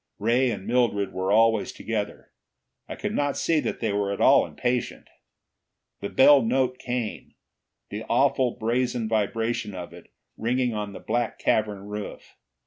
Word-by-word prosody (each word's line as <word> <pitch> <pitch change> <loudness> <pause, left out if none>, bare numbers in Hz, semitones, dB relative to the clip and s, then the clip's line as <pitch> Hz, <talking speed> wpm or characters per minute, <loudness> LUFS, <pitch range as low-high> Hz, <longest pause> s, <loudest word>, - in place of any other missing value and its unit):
Ray 120 +4 +2
and 100 -4 -4
Mildred 115 -4 +1
were 95 +1 -1
always 110 0 +3
together; 105 -2 -5 0.6
I - - -5
could - - -4
not 145 -1 0
see 165 -2 +2
that - - -3
they 110 -3 0
were 100 -1 0
at 100 - -4
all - - +5
impatient. 125 0 -2 0.9
The 100 - -4
bell 140 +1 +6
note 125 +2 0
came, 120 -3 -4 0.6
the - - -5
awful 125 -2 +2
brazen 120 0 0
vibration 110 -1 -1
of 90 -1 -7
it 85 - -13 0.3
ringing 125 +1 0
on 105 -1 -4
the - - -8
black 120 -1 -2
cavern 105 -2 0
roof. 105 0 -7
115 Hz, 150 wpm, -25 LUFS, 105-125 Hz, 0.9 s, bell